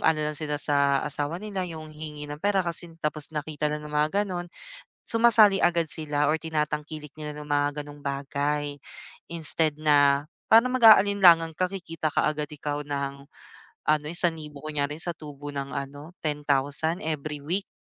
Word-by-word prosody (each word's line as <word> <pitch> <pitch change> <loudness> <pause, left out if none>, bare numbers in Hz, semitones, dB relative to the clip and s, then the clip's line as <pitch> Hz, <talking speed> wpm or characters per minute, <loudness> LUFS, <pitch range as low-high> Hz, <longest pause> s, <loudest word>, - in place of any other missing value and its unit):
ano 160 -1 +2
lang 150 - -2
sila 150 -1 -2
sa 140 -2 +2
asawa 150 +2 -2
nila, 190 -2 -4
yung 155 -1 -9
hihingi 150 -1 -8
ng 150 - -9
pera 200 -2 +1
kasi 170 0 -2
tapos 150 -2 -2
nakita 150 0 -3
lang 150 0 -5
ng 150 - -9
mga 155 +8 +1
ganon. 175 -2 -5 0.6
Sumasali 225 -4 +5
agad 170 -2 +2
sila 150 -1 +1
or 155 - +2
tinatangkilik 150 -1 -4
nila 150 -1 -6
ng 150 - -9
mga 145 0 0
ganong 145 0 -13
bagay, 145 +1 -2 0.6
instead 160 -1 +3
na, 145 -1 +3 0.2
parang 230 +3 +7
mag-aalinlangang 195 -8 +6
ka 185 +1 -1
kikita 165 -5 -4
kaagad 150 0 -1
ikaw 145 0 -4
ng 140 -1 -4 0.7
ano 150 -1 +1
1,000 160 -3 +2
kunyari 150 -1 -3
sa 175 - 0
tubo 145 -2 -9
ng 140 -1 -5
ano 145 +5 -7
10,000 150 +2 0
every 150 -2 -4
week, 185 +6 -2
150 Hz, 155 wpm, -26 LUFS, 145-165 Hz, 0.7 s, parang